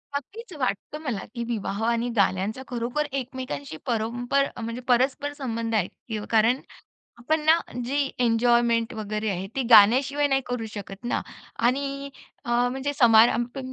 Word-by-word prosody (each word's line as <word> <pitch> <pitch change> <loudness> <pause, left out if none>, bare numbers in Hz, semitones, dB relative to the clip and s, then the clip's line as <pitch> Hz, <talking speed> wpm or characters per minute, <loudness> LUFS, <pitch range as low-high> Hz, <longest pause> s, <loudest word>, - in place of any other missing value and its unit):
नक्कीच 390 - -6
वाटतं 255 +4 -2
मला, 245 -9 -3
की 235 - -3
विवाह 220 -2 -3
आणि 235 +1 +1
गाण्यांचा 200 +4 +1
खरोखर 245 +5 -2
एकमेकांशी 255 - -5
परंपर 245 +4 0 0.2
म्हणजे 230 +2 -5
परस्पर 270 +4 +1
संबंध 230 -4 -2
आहे. 195 -4 +2 0.2
य 215 -2 -3
कारण 225 +3 +3 0.6
आपण 310 +6 0
ना 320 +1 +6 0.3
जी 280 +1 0
एन्जॉयमेंट 235 0 +2
वगैरे 215 0 -3
आहे 190 0 -3
ती 270 - 0
गाण्याशिवाय 255 +7 +6
नाही 270 -1 +2
करू 245 -2 -3
शकत 200 +1 -8
ना. 240 - -1 0.4
आणि 275 +3 0 0.4
अ, 240 - -3 0.2
म्हणजे 270 +2 -2
समारंभ 235 +2 +5
240 Hz, 140 wpm, -25 LUFS, 225-270 Hz, 0.6 s, ना